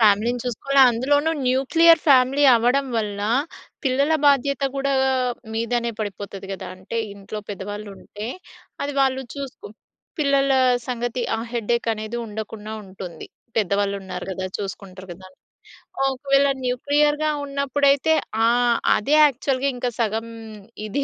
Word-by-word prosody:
ఫ్యామిలీని 220 +3 +3
చూసుకోవాల 270 +3 +1
అందులోనూ 285 +6 +1 0.2
న్యూక్లియర్ 325 +6 +5
ఫ్యామిలీ 270 0 +5
అవ్వడం 245 +4 +2
వల్ల, 205 -2 -2 0.6
పిల్లల 275 +3 +2
బాధ్యత 280 0 +3
గూడా 275 0 0
గా 265 - +2 0.4
మీదనే 235 +1 -1
పడిపోతది 200 -1 -6
గదా! 190 -1 -6
అంటే 185 +5 -7 0.2
ఇంట్లో 200 +1 -7
పెద్దవాళ్ళు 205 +1 -6
ఉంటే, 210 +1 -8 0.6
అది 285 0 -3
వాళ్ళు 265 -1 +2
చూసుకో 275 -5 -7 0.5
పిల్లల 275 -2 +2 0.4
సంగతి 245 0 -2
ఆ - - -4
హెడ్డేకనేది 230 -1 -1
ఉండకుండా 215 0 -7
ఉంటుంది. 185 -4 -9 0.3
పెద్దవాళ్ళున్నారు 200 -2 -1
గదా! 185 0 -4
చూసుకుంటారు 190 -1 -7
గదాని.. 185 +1 -14 0.8
ఒకవేళ 275 +1 +2 0.2
న్యూక్లియర్‌గా 295 +4 +1 0.2
ఉన్నప్పుడైతే 280 +2 +2 0.3
ఆహ్, 240 0 +3 0.2
అదే 280 +8 +1
యాక్చువల్‌గా 275 0 0
ఇంకా 245 0 -2
సగం 225 0 -1 0.6
ఇది 275 +7 -1
240 Hz, 115 wpm, -22 LUFS, 205-275 Hz, 0.8 s, న్యూక్లియర్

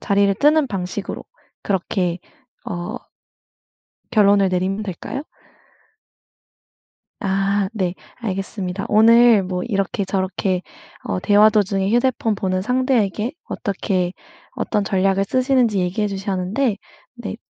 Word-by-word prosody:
자리를 200 0 +2
뜨는 300 0 +4
방식으로 195 -2 -4 0.4
그렇게 180 -2 -1 0.5
어 210 +1 -5 1.1
결론을 200 -3 +4
내리면 185 +3 -1
될까요? 210 - -5 2.0
아 195 0 0
네. 185 -5 -1 0.2
알겠습니다. 195 -3 -4
오늘 230 0 +6
뭐 180 -1 -3
이렇게 200 -3 -1
저렇게 190 -1 -1 0.4
어 90 - -2
대화 210 +1 +5
도중에 200 -2 +1
휴대폰 240 -2 +1
보는 185 -1 -1
상대에게 245 -3 0
어떻게 190 -4 -2 0.4
어떤 210 - -1
전략을 195 0 +1
쓰시는지 255 -2 +2
얘기해 185 +4 0
주셨는데 195 +4 -1 0.4
네 240 -3 -6
200 Hz, 250 characters per minute, -20 LUFS, 190-220 Hz, 2.0 s, 오늘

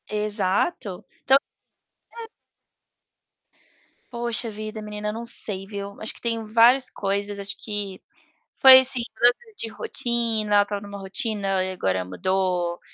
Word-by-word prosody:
Exato. 205 - -1 0.2
Então 265 +1 +6 0.8
É. 460 -1 -10 1.8
Poxa 235 -1 -2
vida, 215 +1 -7
menina, 210 0 -5
não 230 +2 -6
sei, 200 -4 -1
viu. 200 0 -7
Acho 215 - -4
que - - -17
tem 230 -1 -2
várias 235 +4 +4
coisas. 200 +1 -3
Acho 200 0 -4
que 205 -3 -5 0.6
foi, 260 -1 +11
assim, 260 -1 +2
mudanças 245 - +2
de 230 - -6
rotina. 230 -3 -2
Eu 205 - +6
estava 205 0 -5
numa 200 0 -9
rotina, 195 0 -2
aí 185 0 -1
agora 95 - -1
mudou. 175 - -1
210 Hz, 130 wpm, -24 LUFS, 195-235 Hz, 1.8 s, foi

